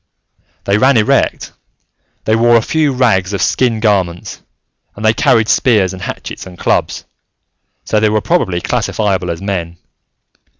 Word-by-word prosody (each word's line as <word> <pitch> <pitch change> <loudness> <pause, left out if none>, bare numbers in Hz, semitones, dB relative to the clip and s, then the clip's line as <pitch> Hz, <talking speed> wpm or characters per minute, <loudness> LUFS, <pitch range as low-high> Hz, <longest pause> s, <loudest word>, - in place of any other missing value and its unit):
They 100 +1 +1
ran 130 +1 +4
erect, 105 - 0 0.7
they 110 - +2
wore 120 +1 +4
a 115 - +3
few 155 0 0
rags 100 -7 +1
of 100 - -2
skin 120 -4 +1
garments, 95 -6 -1 0.5
and 105 - -6
they 110 - +4
carried 110 0 +2
spears 105 -7 +2
and 95 - -9
hatchets - - -7
and 90 -1 -12
clubs, - - -1 0.8
so 110 - +1
they 110 0 +2
were 110 0 +1
probably 105 - -1
classifiable 95 -4 -1
as 85 +2 -5
men. 85 -4 -4
105 Hz, 145 wpm, -14 LUFS, 95-115 Hz, 0.8 s, ran